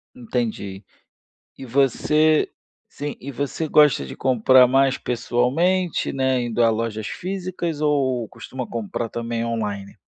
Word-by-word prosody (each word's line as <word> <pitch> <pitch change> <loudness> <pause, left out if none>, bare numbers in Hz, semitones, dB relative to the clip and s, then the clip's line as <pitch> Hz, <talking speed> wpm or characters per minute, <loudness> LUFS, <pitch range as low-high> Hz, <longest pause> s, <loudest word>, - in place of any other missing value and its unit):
Entendi. 110 -5 -4 0.7
E 135 - -8
você 150 +4 +2 0.4
sim, 145 0 -6
e 140 +2 -7
você 145 +5 -3
gosta 150 - +4
de - - -8
comprar 130 0 +5
mais 135 +1 +3
pessoalmente, 145 +10 0
né, 130 -1 +1
indo 120 0 0
a 115 - +5
lojas 110 -1 -2
físicas 180 - -4
ou 130 -6 +1
costuma 125 +2 -7
comprar 115 0 -4
também 115 0 -3
on-line? 105 -4 -4
125 Hz, 125 wpm, -22 LUFS, 115-145 Hz, 0.7 s, comprar